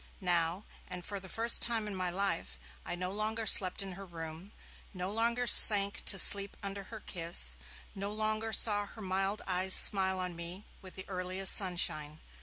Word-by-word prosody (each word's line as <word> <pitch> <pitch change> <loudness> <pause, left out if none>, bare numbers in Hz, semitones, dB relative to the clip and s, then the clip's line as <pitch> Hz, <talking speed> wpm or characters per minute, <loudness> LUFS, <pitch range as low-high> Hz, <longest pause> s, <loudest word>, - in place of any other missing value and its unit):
Now, 175 0 0 0.3
and 180 -1 -7
for 200 -1 -5
the 190 0 -10
first 230 +5 +2
time 230 -2 +1
in 205 - -4
my 185 -1 -1
life, 185 -1 -2 0.3
I - - -4
no 180 +1 -5
longer 215 +2 -2
slept 185 -2 +3
in 195 - -7
her 195 +2 -9
room, 165 +1 -10 0.4
no 180 +1 -4
longer 235 +3 0
sank 200 -3 +3
to 195 - +2
sleep 200 +1 +5
under 200 0 -6
her 220 0 -11
kiss, 165 - -3 0.4
no 200 +1 -6
longer 215 +1 -2
saw 205 -2 0
her 220 - -12
mild 195 +2 -2
eyes 185 0 +3
smile 190 -2 +5
on 180 -1 -4
me 170 +4 -5 0.2
with 185 -2 -13
the 190 - -7
earliest 185 0 +2
sunshine. 155 -5 0
195 Hz, 180 wpm, -31 LUFS, 180-205 Hz, 0.4 s, sleep